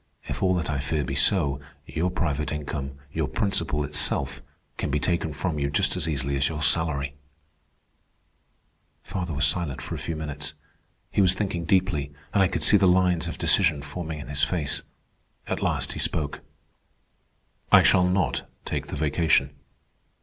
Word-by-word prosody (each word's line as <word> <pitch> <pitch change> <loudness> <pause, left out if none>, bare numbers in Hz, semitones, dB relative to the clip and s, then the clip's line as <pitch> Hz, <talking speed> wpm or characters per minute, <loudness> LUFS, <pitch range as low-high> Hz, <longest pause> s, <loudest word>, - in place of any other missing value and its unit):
"If - - -5
all 95 -1 +3
that 85 - -1
I 70 - -1
fear 75 +1 -1
be - - -4
so, 70 -8 +2 0.3
your 85 +3 -1
private 80 -6 -1
income, 70 -2 -4 0.2
your 80 -3 -1
principal 85 - 0
itself, 70 -1 +2 0.4
can - - -2
be 75 +1 +1
taken 85 0 0
from 75 +2 -2
you 70 0 0
just 70 - +2
as 85 -3 -1
easily 70 -2 -1
as 70 0 +2
your 75 -2 -4
salary." 70 -5 +1 1.9
Father 85 -3 -4
was 75 0 +2
silent 75 -2 0
for - - -6
a - - -4
few 80 - -4
minutes. 75 -1 -5 0.6
He - - +2
was 95 -1 +5
thinking 95 -4 -2
deeply, 90 -6 +1 0.2
and 100 - +4
I 95 - +5
could - - -3
see 105 - +7
the 95 -1 +4
lines 90 -2 +3
of - - -5
decision 80 -7 +3
forming 80 +1 -5
in 75 - -8
his 75 0 0
face. 75 -2 0 0.6
At - - -3
last - - 0
he - - -6
spoke. 75 -2 -1 1.3
"I - - +8
shall 90 0 +4
not 90 -10 0 0.2
take - - -3
the - - -5
vacation." 75 -2 +2
80 Hz, 170 wpm, -25 LUFS, 70-90 Hz, 1.9 s, I